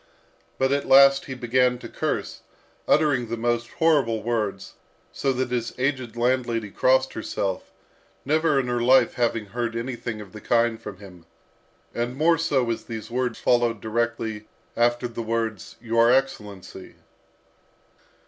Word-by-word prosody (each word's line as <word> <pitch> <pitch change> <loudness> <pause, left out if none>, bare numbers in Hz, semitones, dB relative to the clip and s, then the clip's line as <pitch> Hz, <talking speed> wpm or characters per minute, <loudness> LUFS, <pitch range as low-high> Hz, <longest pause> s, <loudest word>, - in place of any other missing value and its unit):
but 135 0 +1
at 140 0 0
last 135 0 +6
he 130 - -6
began 125 0 +1
to - - -9
curse, - - -3 0.5
uttering 145 -6 +2
the 115 +1 -4
most 120 0 -1
horrible 135 -10 +2
words, 105 -4 -2 0.4
so 135 - -1
that 130 -1 -2
his 120 -2 -2
aged 130 -3 -2
landlady 120 -3 0
crossed 130 +4 +2
herself, 100 -3 -4 0.5
never 155 0 +2
in 130 - -1
her 120 -1 -1
life 130 +2 +4
having 115 -3 0
heard 115 +2 -4
anything 120 -2 -4
of 105 -2 -10
the 105 - -10
kind 115 0 +1
from 105 -4 -8
him, 90 -5 -14 0.7
and 120 +2 -3
more 165 +2 +3
so 135 -6 +1
as 115 - -4
these 115 0 -7
words 125 -1 -1
followed 120 -2 +1
directly 110 -1 -2 0.3
after 120 +1 +1
the 115 0 -6
words 115 -2 -3
"your 115 0 +3
excellency." 105 -8 -2
120 Hz, 145 wpm, -24 LUFS, 115-130 Hz, 0.7 s, last